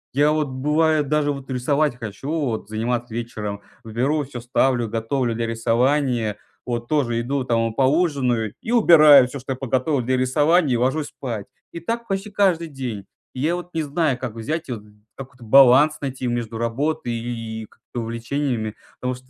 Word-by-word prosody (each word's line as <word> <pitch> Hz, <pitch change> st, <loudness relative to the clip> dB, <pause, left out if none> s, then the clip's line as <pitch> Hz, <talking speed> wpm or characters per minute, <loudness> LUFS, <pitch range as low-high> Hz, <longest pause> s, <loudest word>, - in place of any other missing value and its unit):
Я 145 Hz, +2 st, +4 dB
вот 155 Hz, -1 st, 0 dB
бывает 150 Hz, +3 st, +1 dB
даже 150 Hz, -1 st, +2 dB
вот 140 Hz, -1 st, -7 dB
рисовать 140 Hz, +3 st, +1 dB
хочу, 115 Hz, +3 st, -7 dB
вот 135 Hz, -10 st, -2 dB
заниматься 120 Hz, +1 st, -2 dB
вечером, 105 Hz, -4 st, -5 dB, 0.2 s
беру 125 Hz, +7 st, 0 dB
вот 145 Hz, -, -2 dB
всё 125 Hz, -4 st, -7 dB
ставлю, 120 Hz, -1 st, +1 dB
готовлю 115 Hz, +2 st, -1 dB
для 115 Hz, 0 st, -2 dB
рисования, 115 Hz, 0 st, +1 dB, 0.3 s
вот 120 Hz, -1 st, -3 dB
тоже 125 Hz, -6 st, +1 dB
иду, 135 Hz, +3 st, -1 dB
там 115 Hz, -2 st, 0 dB
поужинаю 130 Hz, -, +1 dB
и 225 Hz, -, -5 dB
убираю 155 Hz, -, +7 dB
всё, 135 Hz, +2 st, -7 dB
что 135 Hz, +1 st, -4 dB
я -, -, -6 dB
подготовил 130 Hz, +2 st, 0 dB
для 130 Hz, +2 st, 0 dB
рисования, 145 Hz, +3 st, +3 dB
и -, -, +1 dB
ложусь 135 Hz, +5 st, 0 dB
спать. 115 Hz, -6 st, -6 dB, 0.2 s
И 170 Hz, -, -6 dB
так 230 Hz, +7 st, -3 dB
почти 195 Hz, +1 st, -3 dB
каждый 185 Hz, -5 st, +1 dB
день. 125 Hz, -9 st, -6 dB, 0.3 s
И -, -, -7 dB
я 160 Hz, +4 st, +1 dB
вот 175 Hz, 0 st, -8 dB
не 160 Hz, -, 0 dB
знаю, 145 Hz, -3 st, 0 dB
как 120 Hz, -4 st, -5 dB
взять 155 Hz, +8 st, -4 dB
вот 115 Hz, -4 st, -5 dB, 0.3 s
какой-то 130 Hz, -2 st, -11 dB
баланс 135 Hz, +5 st, +6 dB
найти 130 Hz, -2 st, -4 dB
между 115 Hz, -2 st, -3 dB
работой 135 Hz, +4 st, -1 dB
и 115 Hz, -1 st, -5 dB
и -, -, -9 dB
как-то 120 Hz, +3 st, -9 dB
увлечениями, 115 Hz, -1 st, -3 dB, 0.3 s
потому 125 Hz, 0 st, -1 dB
что 130 Hz, -, -16 dB
130 Hz, 175 wpm, -22 LUFS, 115-150 Hz, 0.3 s, убираю